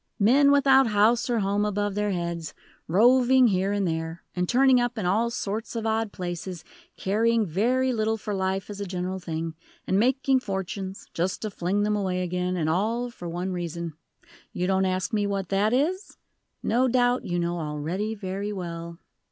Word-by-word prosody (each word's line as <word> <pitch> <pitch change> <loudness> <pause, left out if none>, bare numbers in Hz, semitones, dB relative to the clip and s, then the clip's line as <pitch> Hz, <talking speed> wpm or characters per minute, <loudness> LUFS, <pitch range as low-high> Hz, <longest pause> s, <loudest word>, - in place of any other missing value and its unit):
"Men, 265 +7 +5
without 270 -2 +5
house 220 +3 +3
or 235 -3 +1
home 200 +1 +1
above 205 -1 -1
their 210 +1 0
heads, 170 -3 -3 0.3
roving 250 +6 +5
here 190 0 +1
and 200 -2 0
there, 165 0 -3
and 180 -1 -1
turning 255 0 +5
up 245 0 -2
in 210 - -2
all 215 +6 +2
sorts 220 -1 -4
of 225 -1 -3
odd 220 -1 0
places; 175 -1 -5 0.3
caring 225 +3 +2
very 250 +9 +1
little 220 -1 0
for 210 -1 -5
life 190 +1 -2
as 205 0 -7
a 200 - -3
general 185 +1 -3
thing, 165 -2 -4 0.3
and 190 - +1
making 260 +3 +3
fortunes 195 -2 -5
just 180 +5 -2
to 215 - -3
fling 195 +2 -1
them 210 0 +1
away 185 -3 -1
again, 180 +1 -2
and 160 -3 0
all 225 +9 0
for 175 -6 -8
one 175 +3 -3
reason. 170 -2 -4 0.6
You 180 - -2
don't 190 0 +2
ask 185 +4 -1
me 205 -1 +1
what 195 -2 -2
that 200 +2 +2
is? 325 - -1 0.5
No 245 +4 +2
doubt 245 0 +2
you 175 - -2
know 175 0 -1
already 165 +8 -3
very 200 0 -4
well." 170 -3 -6
200 Hz, 180 wpm, -26 LUFS, 180-230 Hz, 0.6 s, Men